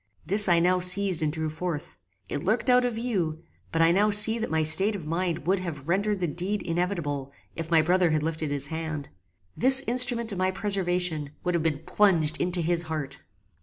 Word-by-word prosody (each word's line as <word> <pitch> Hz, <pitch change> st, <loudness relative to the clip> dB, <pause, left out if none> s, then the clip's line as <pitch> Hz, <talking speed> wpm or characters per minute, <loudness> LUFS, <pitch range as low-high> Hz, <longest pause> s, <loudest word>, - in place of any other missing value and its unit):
This 200 Hz, +3 st, +2 dB
I 175 Hz, -, +3 dB
now 180 Hz, +2 st, +1 dB
seized 180 Hz, -1 st, +3 dB
and 155 Hz, -1 st, -1 dB
drew 160 Hz, 0 st, -4 dB
forth. 160 Hz, -, -6 dB, 0.3 s
It 145 Hz, -, -5 dB
lurked 220 Hz, +7 st, 0 dB
out 250 Hz, 0 st, +3 dB
of 245 Hz, -2 st, -3 dB
view: 180 Hz, -9 st, -3 dB, 0.3 s
but 165 Hz, 0 st, +1 dB
I 165 Hz, -, +3 dB
now 205 Hz, +4 st, +2 dB
see 215 Hz, +2 st, +6 dB
that 230 Hz, -, -4 dB
my 160 Hz, 0 st, -1 dB
state 190 Hz, +8 st, +5 dB
of 175 Hz, -6 st, -8 dB
mind 170 Hz, +1 st, -3 dB
would 190 Hz, +2 st, 0 dB
have 160 Hz, -6 st, -8 dB
rendered 200 Hz, +3 st, -1 dB
the -, -, 0 dB
deed 185 Hz, +6 st, -4 dB
inevitable 165 Hz, -6 st, -4 dB, 0.2 s
if 165 Hz, -1 st, -6 dB
my 165 Hz, -2 st, +3 dB
brother 180 Hz, +1 st, +1 dB
had 155 Hz, -1 st, -1 dB
lifted 160 Hz, -1 st, -4 dB
his 145 Hz, -1 st, -4 dB
hand. 160 Hz, -3 st, -6 dB, 0.5 s
This 265 Hz, +2 st, +6 dB
instrument 240 Hz, -1 st, +3 dB
of 195 Hz, -, -6 dB
my 185 Hz, 0 st, 0 dB
preservation 180 Hz, -6 st, -1 dB
would 180 Hz, -, -2 dB
have 170 Hz, -, -1 dB
been 155 Hz, -1 st, -2 dB
plunged 170 Hz, -7 st, +1 dB
into 180 Hz, 0 st, +1 dB
his 170 Hz, +1 st, -1 dB
heart. 140 Hz, -3 st, -6 dB
175 Hz, 205 wpm, -25 LUFS, 160-200 Hz, 0.5 s, see